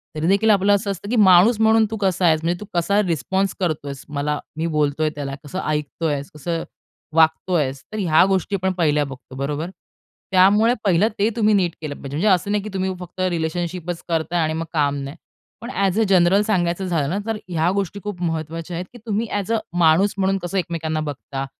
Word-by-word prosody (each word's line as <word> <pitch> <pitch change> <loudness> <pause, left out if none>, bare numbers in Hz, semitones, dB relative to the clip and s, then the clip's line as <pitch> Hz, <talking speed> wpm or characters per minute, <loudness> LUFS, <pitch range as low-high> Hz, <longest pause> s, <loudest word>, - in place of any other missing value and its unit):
तरी 155 +1 -1
देखील 200 +4 +3
आपलं 200 0 +4
असं 200 0 -1
असतं, 195 +1 -7
की 245 - 0
माणूस 205 +2 +6
म्हणून 220 0 +5
तू 220 - -3
कसा 190 -3 +1
आहेस? 160 -2 +4
म्हणजे 175 +1 0
तू 210 - -7
कसा 200 +5 +2
रिस्पॉन्स 185 +5 0
करतो 155 -6 -2
आहेस? 140 -1 -7
मला 150 0 -2 0.2
मी 160 - -1
बोलतोय 150 +1 +1
त्याला 140 -2 -4
कसं 170 +6 -5
ऐकतो 150 0 -3
आहेस? 145 -2 -2
कसं 165 +3 -3 0.5
वागतो 165 +3 +3
आहेस? 135 -5 0
तर - - -3
ह्या 165 -5 +4
गोष्टी 195 +1 0
आपण 190 0 0
पहिल्या 150 -3 +2
बघतो. 135 -1 -11
बरोबर? 145 +5 -3 0.6
त्यामुळे 200 +5 +5
पहिलं 195 +1 +3
ते 210 +2 +3
तुम्ही 215 -2 +3
नीट 185 -4 +2
केलं 150 -2 -5
पाहिजे. 140 - -9
म्हणजे 175 +8 +1
असं 195 0 +2
नाही, 205 -1 0
की 215 - -6
तुम्ही 190 0 -1
फक्त 180 0 -11
रिलेशनशिपचं 175 +1 -3
करताय 165 +2 0
आणि 155 0 -1
मग 165 +1 -3
काम 145 -3 +1
नाही. 140 +2 -7 0.5
पण 235 - -7 0.2
ऍज 195 +2 +1
अ, - - +4
जनरल 185 +1 +5
सांगायचं 190 -3 0
झालं 160 -6 0
ना, 185 - -1
तर 225 -1 -2
ह्या 165 -1 +1
गोष्टी 200 0 -2
खूप 205 -4 -6
महत्वाच्या 165 0 -3
आहेत, 180 - -4
की - - -11
तुम्ही 220 +1 -1
ऍज 200 +3 -4
अ, - - +3 0.2
माणूस 175 +4 +4
म्हणून 195 0 +1
कसं 175 +3 -3
एकमेकांना 165 -3 -2
बघता? 135 -1 -5
175 Hz, 210 wpm, -21 LUFS, 155-195 Hz, 0.6 s, माणूस